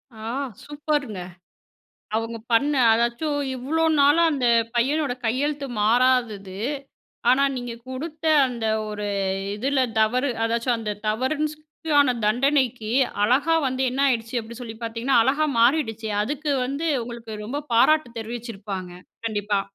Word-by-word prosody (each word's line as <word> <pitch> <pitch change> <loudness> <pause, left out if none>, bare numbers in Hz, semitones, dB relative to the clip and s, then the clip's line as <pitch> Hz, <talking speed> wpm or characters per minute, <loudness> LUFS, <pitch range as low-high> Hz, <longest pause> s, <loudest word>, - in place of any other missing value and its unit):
ஆ! - - -13 0.4
சூப்பருங்க. 290 -8 -3 0.9
அவுங்க 225 +1 -2
பண்ண, 280 +6 +3 0.2
அதாவது 235 +6 0 0.2
இவ்ளோ 315 +6 0 0.2
நாளா 290 +4 +5
அந்த 265 -4 0 0.3
பையனோட 275 +3 +1
கையெழுத்து 280 +5 -1 0.2
மாறாதது. 225 -4 +2 0.7
ஆனா 260 +2 +4
நீங்க 245 -1 -5 0.2
குடுத்த 305 +4 -6 0.2
அந்த 235 -3 -4 0.2
ஒரு, 210 -1 -4 0.5
இதில 265 +5 0 0.2
தவறு, 250 +6 +2 0.2
அதாவது 235 +1 0
அந்த 210 -2 -3 0.2
தவறுன் 260 +8 0
சொ - - -26 0.7
தண்டனைக்கு 250 0 +1 0.3
அழகா 275 +9 +3
வந்து 260 0 -1
என்ன 265 - -2
ஆயிடுச்சு, 230 -2 -1
அப்டி 225 +1 -10
சொல்லி 235 -3 -7
பாத்தீங்கன்னா, 230 +3 0
அழகா 280 +6 +2 0.2
மாறிடுச்சு. 230 -4 +2
அதுக்கு 295 +6 -3
வந்து 280 +6 -3 0.2
உங்களுக்கு 230 -2 -7
ரொம்ப 270 +7 -3
பாராட்டு 305 +4 +4
தெரிவிச்சிருப்பாங்க, 215 -5 -6 0.4
கண்டிப்பா. 205 -2 0
245 Hz, 120 wpm, -24 LUFS, 225-280 Hz, 0.9 s, நாளா